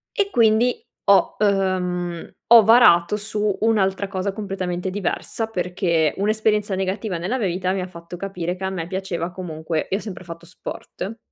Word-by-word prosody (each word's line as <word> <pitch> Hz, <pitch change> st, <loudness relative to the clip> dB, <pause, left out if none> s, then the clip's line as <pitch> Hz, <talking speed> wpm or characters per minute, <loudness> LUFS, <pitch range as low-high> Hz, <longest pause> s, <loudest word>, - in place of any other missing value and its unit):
E 405 Hz, -3 st, +1 dB
quindi 235 Hz, -, +3 dB, 0.2 s
ho 200 Hz, -1 st, +4 dB
uhm, 180 Hz, -4 st, 0 dB
ho 230 Hz, -1 st, +9 dB
varato 210 Hz, -5 st, +6 dB
su 210 Hz, -1 st, -2 dB
un'altra 200 Hz, -3 st, +1 dB
cosa 195 Hz, 0 st, -2 dB
completamente 190 Hz, -3 st, -3 dB
diversa, 205 Hz, +3 st, -3 dB
perché 180 Hz, -6 st, 0 dB
un'esperienza 210 Hz, 0 st, +1 dB
negativa 190 Hz, 0 st, -2 dB
nella 195 Hz, +10 st, -2 dB
mia 215 Hz, -, 0 dB
vita 185 Hz, +1 st, -1 dB
mi 195 Hz, -, -1 dB
ha 180 Hz, -, -4 dB
fatto 170 Hz, 0 st, -10 dB
capire 180 Hz, -2 st, -4 dB
che 190 Hz, -, -8 dB
a -, -, 0 dB
me 175 Hz, -3 st, -4 dB
piaceva 180 Hz, -2 st, -3 dB
comunque 160 Hz, -3 st, -4 dB
io 195 Hz, -, +1 dB
ho -, -, -9 dB
sempre 185 Hz, -4 st, -8 dB
fatto 170 Hz, 0 st, -9 dB
sport. 195 Hz, +4 st, -7 dB
190 Hz, 165 wpm, -22 LUFS, 180-210 Hz, 0.2 s, ho